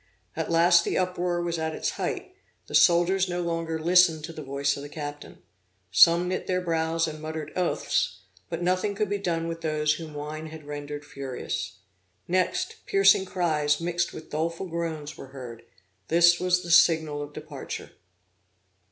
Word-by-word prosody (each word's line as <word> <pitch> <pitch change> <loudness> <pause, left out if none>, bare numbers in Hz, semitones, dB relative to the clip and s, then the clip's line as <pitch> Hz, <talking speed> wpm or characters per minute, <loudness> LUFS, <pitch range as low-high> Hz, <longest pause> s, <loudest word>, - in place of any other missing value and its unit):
At 160 - -3
last 170 +1 +5
the - - -1
uproar 180 -1 0
was 170 -1 -2
at 160 0 -2
its - - -1
height; 370 - -4 0.3
the - - -12
soldiers 180 +2 +4
no 175 0 -2
longer 165 -1 -2
listened 170 -1 +4
to 165 +1 -6
the 155 - -7
voice 140 0 -1
of - - -7
the 145 - -8
captain. 145 -1 -8 0.5
Some 170 - +6
knit 185 +1 -3
their 185 -1 +1
brows 165 -1 0
and 155 -1 -7
muttered 155 -1 -5
oaths; 135 - 0 0.3
but 170 +1 -3
nothing 185 +3 0
could 210 -1 -1
be 205 - 0
done 165 -3 -1
with 165 0 -5
those 155 -1 +1
whom 155 -1 -8
wine 155 +2 -5
had 155 0 -10
rendered 145 0 -6
furious. 130 -9 -5 0.5
Next, 185 +1 0
piercing 195 -1 +5
cries 155 -6 +1
mixed 175 0 -1
with 160 - -11
doleful 165 +4 -2
groans 160 -3 -4
were 135 - -9
heard 120 -3 -8 0.5
this 170 +1 +5
was 180 0 +1
the 170 - -4
signal 160 -3 +4
of 145 0 -6
departure. - - -7
165 Hz, 170 wpm, -26 LUFS, 150-175 Hz, 0.5 s, Some